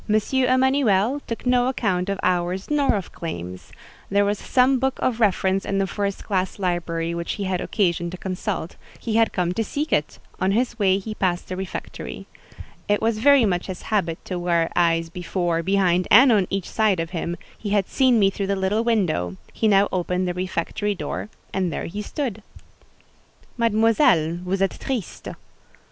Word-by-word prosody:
Emanuel 260 -2 +3
took 230 - -5
no 250 0 +3
account 200 -7 0
of 200 -1 -2
hours 180 +5 0
nor 285 -5 +3
of 195 - -4
claims: 90 - -7 0.4
there 200 +1 +3
was 205 0 0
some 260 +1 +3
book 265 +1 0
of 240 -3 0
reference 195 -2 +2
in 195 - -2
the 195 - +2
first 200 +1 -3
class 190 -3 -1
library 170 -3 -1
which 170 0 -3
he 205 - -4
had 185 -2 -1
occasion 175 -4 0
to 185 - -7
consult; 185 -2 -4 0.2
he 225 -2 -1
had 225 -1 +3
come 180 -2 0
to 225 - -1
seek 295 +7 -3
it: 150 - 0 0.2
on 190 +1 +1
his 235 +1 0
way 190 -2 +3
he 215 +2 -5
passed 180 -4 -1
the 185 - -3
refectory. 190 0 -6 0.6
It 205 0 +2
was 225 -1 0
very 280 0 +6
much 180 -3 -1
his 185 -2 -6
habit 170 -6 +1
to 180 -2 -3
wear 170 -2 +1
eyes 165 -1 +2
before, 175 -1 -1
behind, 185 -1 +2
and 250 +4 +8
on 200 -5 +3
each 195 -2 -2
side 215 -5 +1
of 165 +1 -3
him: 175 0 -3 0.2
he 210 - -6
had 200 -2 +1
seen 260 -3 +3
me 195 -2 +4
through 195 0 -3
the 200 - +1
little 195 +4 0
window—he 185 - -1
now 200 -1 +5
opened 180 0 -1
the 180 - -1
refectory 185 +3 -2
door, 200 - -5 0.2
and 185 -3 0
there - - -4
he 205 +5 -5
stood. 225 -2 -4 1.1
"Mademoiselle, 220 - +3
vous 190 +1 -1
êtes 195 - -6
triste." 250 -9 -4
195 Hz, 180 wpm, -23 LUFS, 180-225 Hz, 1.1 s, and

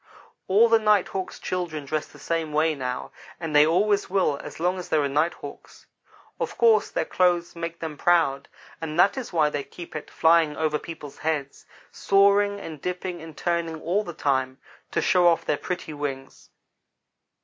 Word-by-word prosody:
"All 210 +5 +5
the 225 -1 +4
Night 210 -3 +3
hawk's 190 -1 -5
children 170 -5 -4
dress 155 +2 -2
the - - -17
same 165 -2 -2
way 155 +1 +2
now; 125 -3 -4 0.3
and 160 -3 -4
they 150 +1 +7
always 200 +5 +2
will 185 -7 +1
as - - -9
long 180 +2 0
as 180 - -8
there 155 -2 +2
are - - +1
Night 150 +5 +1
hawks. - - -12 0.5
Of - - -3
course 225 -3 +4
their - - -1
clothes 175 -1 +1
make 170 0 -5
them 160 -3 -5
proud; 160 -6 +2 0.3
and 160 0 -4
that 195 - +5
is 265 -3 -5
why 155 -3 +2
they 145 -1 -3
keep 170 +2 -11
at 155 - -6
flying 160 -2 +3
over 155 -1 0
people's 150 -4 -9
heads 150 -3 -3 0.2
soaring 200 +1 +3
and 160 -7 -8
dipping 180 -1 -4
and 160 -2 -11
turning 170 -2 -1
all 180 +7 0
the 175 - -6
time, 130 -3 0 0.3
to - - -1
show 180 -1 +4
off 170 -1 +3
their - - +1
pretty 180 -3 -5
wings. 135 -2 -6
165 Hz, 180 wpm, -25 LUFS, 150-180 Hz, 0.5 s, they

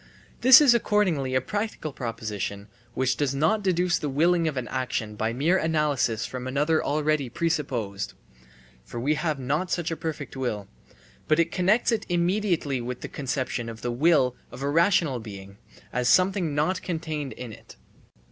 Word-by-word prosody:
This 260 +3 +9
is 275 -5 +7
accordingly 185 - +1
a 130 - +3
practical 205 -8 -4
proposition 105 -4 -4 0.3
which 130 0 +1
does 140 -2 0
not 160 +10 +2
deduce 180 -2 +1
the 150 - -3
willing 165 +4 +2
of 150 -4 -2
an 125 -2 -3
action 125 -5 -3
by 110 +2 -1
mere 155 +10 +2
analysis 150 -8 0
from 130 0 -6
another 145 +4 +1
already 150 -2 0
presupposed 125 -10 -2 0.7
(for 120 - -7
we 140 +6 +1
have 150 0 -1
not 145 +7 -1
such 170 -3 -1
a - - -1
perfect 155 -4 -5
will), 110 -7 -3 0.6
but 165 +2 +2
connects 195 +7 +2
it 225 -2 -1
immediately 175 - 0
with 125 +1 -5
the - - -5
conception 130 -3 -3
of 115 0 -9
the 120 - -1
will 130 -1 +3 0.2
of 135 - -8
a 140 - 0
rational 165 -5 +3
being, 100 -3 -10 0.4
as 125 0 +1
something 185 -5 +3
not 185 +6 0
contained 160 -6 -4
in 125 -3 -8
it. - - -14
145 Hz, 165 wpm, -26 LUFS, 125-170 Hz, 0.7 s, This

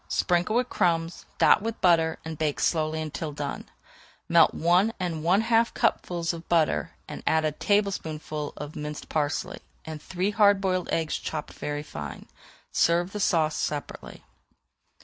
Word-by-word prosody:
Sprinkle 180 +4 +1
with 250 +1 +2
crumbs, 165 -1 0
dot - - +5
with 225 +1 -4
butter, 165 -3 +3
and 160 0 -5
bake 150 -1 -1
slowly 155 -1 0
until 155 0 -4
done. 145 -1 -5 0.6
Melt 170 -1 +5
one 180 +7 +3
and 170 -4 -3
one 185 +5 +4
half 230 0 +2
cupfuls 175 -7 0
of 170 0 -10
butter 155 - +1
and - - -7
add 160 0 +3
a 155 - +1
tablespoonful 155 -5 -1
of 150 +1 -7
minced 150 0 -6
parsley, 145 -2 -2 0.3
and 155 -1 -7
three 185 +5 -2
hard 205 -2 +5
boiled 185 -2 -1
eggs 160 -2 -1
chopped 155 -2 -5
very 145 0 -4
fine. 75 - -8 0.5
Serve 175 +2 +2
the 210 - -5
sauce 160 -5 +2
separately. 145 -1 -5
165 Hz, 150 wpm, -26 LUFS, 155-185 Hz, 0.6 s, dot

